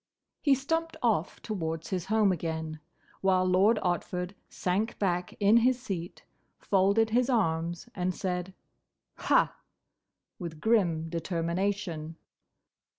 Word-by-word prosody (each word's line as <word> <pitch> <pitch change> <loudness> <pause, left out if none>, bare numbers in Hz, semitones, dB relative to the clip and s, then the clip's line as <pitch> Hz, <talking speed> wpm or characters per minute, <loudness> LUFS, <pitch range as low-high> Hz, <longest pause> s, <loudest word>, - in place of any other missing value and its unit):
He 280 -3 +4
stumped 325 +4 -2
off 210 -7 +1
towards 165 -6 -3
his 180 -2 -1
home 215 -1 +3
again, 160 -2 -3 0.4
while 185 -1 +3
Lord 190 +5 +4
Otford 180 0 -2 0.2
sank 200 +5 -1
back 180 -3 -1
in 205 +2 +6
his 250 +2 +3
seat, 180 -8 -5 0.3
folded 200 +3 +2
his 245 +3 +2
arms, 170 -6 0
and 180 0 -1
said, 180 0 -3 0.6
"Ha!" - - +3 0.8
with 165 -4 -6
grim 175 -6 +2
determination. 170 0 -2
185 Hz, 110 wpm, -29 LUFS, 170-215 Hz, 0.8 s, in